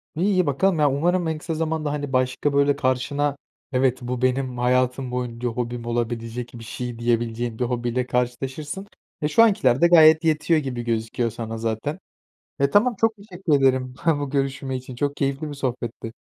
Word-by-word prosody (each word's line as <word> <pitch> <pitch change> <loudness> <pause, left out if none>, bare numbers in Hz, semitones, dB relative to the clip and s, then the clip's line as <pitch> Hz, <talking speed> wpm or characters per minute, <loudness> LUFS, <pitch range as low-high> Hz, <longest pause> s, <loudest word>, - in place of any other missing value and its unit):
İ 160 - -3
iyi, 185 -2 +3
bakalım. 160 +5 +1
Ya, 145 -1 +4
umarım 175 +5 +1
en 160 -1 -1
kısa 165 +2 -4
zamanda, 155 -2 -1
hani, 145 -2 -4
başka, 130 +3 +1
böyle, 140 0 +3
karşına 140 +2 0 0.3
"Evet, 130 -1 +2
bu 125 0 -4
benim 130 0 0
hayatım 125 +1 +1
boyunca 125 -1 -3
hobim 120 0 -4
olabilecek 120 0 -3
bir 115 -1 -9
şey." 120 +1 -6
diyebileceğin 115 -1 -1
bir - - +1
hobiyle 120 0 -1
karşılaşırsın. 135 +9 -3 0.3
E, 150 - +1
şu 190 +10 +5
ankiler 195 - +3
de 170 - +7
gayet 160 -1 +7
yetiyor 160 0 +2
gibi 130 -4 -4
gözüküyor 115 0 -1
sana 115 0 -5
zaten. 115 - -3 0.6
E, 140 0 +3
tamam, 225 - +3
çok 225 -1 +3
teşekkür 190 -5 -3
ederim 130 -2 +2 0.3
bu 145 -1 -3
görüşme 135 -1 -2
için. 130 0 -9
Çok 145 +3 -1
keyifli 140 +2 -1
bir - - -6
sohbetti. 120 -4 -4
130 Hz, 175 wpm, -23 LUFS, 120-150 Hz, 0.6 s, de